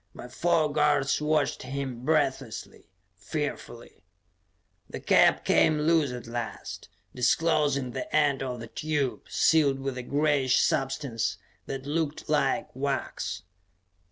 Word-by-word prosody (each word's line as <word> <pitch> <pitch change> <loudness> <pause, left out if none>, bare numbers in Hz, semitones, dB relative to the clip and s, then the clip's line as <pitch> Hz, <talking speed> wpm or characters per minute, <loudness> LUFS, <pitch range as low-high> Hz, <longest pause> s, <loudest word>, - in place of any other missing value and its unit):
My - - -9
four 155 +2 +1
guards 145 -2 +2
watched 150 -1 +1
him 130 -2 -5
breathlessly, 135 -5 -1 0.3
fearfully. 120 - -6 0.9
The - - -6
cap - - +4
came 155 - +4
loose 155 -3 +3
at 125 -1 -7
last, 115 -1 -6 0.2
disclosing 145 0 +1
the 210 - -5
end 145 -3 +3
of 125 -2 -4
the 115 - -7
tube, 145 0 -2
sealed 145 -4 +3
with 135 -1 -4
a - - -3
grayish 140 -1 +2
substance 135 -4 -1 0.3
that 135 0 -5
looked 155 0 -2
like 145 -5 0
wax. 135 - -3
140 Hz, 120 wpm, -27 LUFS, 130-150 Hz, 0.9 s, cap